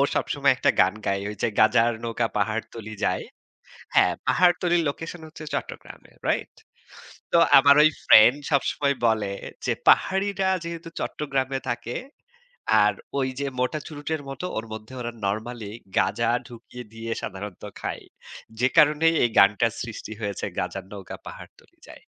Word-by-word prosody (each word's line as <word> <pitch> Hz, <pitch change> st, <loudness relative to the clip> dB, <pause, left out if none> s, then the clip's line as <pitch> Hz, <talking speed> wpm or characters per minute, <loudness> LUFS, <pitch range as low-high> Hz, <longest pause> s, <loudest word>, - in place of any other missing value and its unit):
সবসময় 140 Hz, -2 st, +2 dB
একটা -, -, +2 dB
গান 95 Hz, +2 st, +3 dB
গায়। 100 Hz, 0 st, 0 dB
ওই 105 Hz, -, -6 dB
যে -, -, +2 dB
গাঁজার 115 Hz, +2 st, +5 dB
নৌকা 115 Hz, 0 st, -1 dB
পাহাড়তলি 110 Hz, +1 st, -3 dB
যায়। -, -, 0 dB, 0.7 s
হ্যাঁ 90 Hz, -, +5 dB
পাহাড়তলির 175 Hz, +4 st, +3 dB
লোকেশন 165 Hz, +4 st, -5 dB
হচ্ছে 155 Hz, 0 st, -11 dB
চট্টগ্রামে। -, -, -7 dB, 0.2 s
রাইট? -, -, -1 dB, 0.8 s
তো -, -, +4 dB, 0.2 s
আমার 140 Hz, +1 st, +7 dB
ওই 155 Hz, -, +7 dB, 0.2 s
ফ্রেন্ড 120 Hz, +6 st, +8 dB
সবসময় 140 Hz, 0 st, +1 dB
বলে 105 Hz, -3 st, 0 dB, 0.3 s
যে, -, -, +1 dB
"পাহাড়িরা 195 Hz, 0 st, +3 dB, 0.2 s
যেহেতু 170 Hz, 0 st, -6 dB
চট্টগ্রামে 135 Hz, -2 st, -2 dB
থাকে 120 Hz, 0 st, -3 dB, 0.9 s
আর -, -, +3 dB, 0.3 s
ওই 130 Hz, -, +1 dB
যে 140 Hz, -, -1 dB
মোটা 125 Hz, +5 st, 0 dB
চুরুটের 155 Hz, 0 st, -4 dB
মতো 135 Hz, +6 st, -6 dB
ওর 110 Hz, -, -3 dB
মধ্যে 110 Hz, +3 st, -9 dB
ওরা 120 Hz, -, -4 dB
নরমালি 110 Hz, +1 st, -3 dB, 0.3 s
গাঁজা 110 Hz, +4 st, +1 dB, 0.2 s
ঢুকিয়ে 125 Hz, +1 st, -11 dB
দিয়ে 115 Hz, 0 st, -6 dB
সাধারণত 95 Hz, 0 st, -7 dB, 0.2 s
খায়। -, -, -5 dB, 0.6 s
যে 125 Hz, -, +4 dB
কারণেই 155 Hz, +2 st, +5 dB
এই 120 Hz, -, +3 dB
গানটার 105 Hz, +3 st, +5 dB
সৃষ্টি 115 Hz, -2 st, -8 dB
হয়েছে 100 Hz, -1 st, -3 dB
গাঁজার 90 Hz, +1 st, -4 dB
নৌকা 100 Hz, -2 st, -8 dB
পাহাড়তলি -, -, -13 dB
যায়।" -, -, -13 dB
120 Hz, 140 wpm, -25 LUFS, 110-150 Hz, 0.9 s, ফ্রেন্ড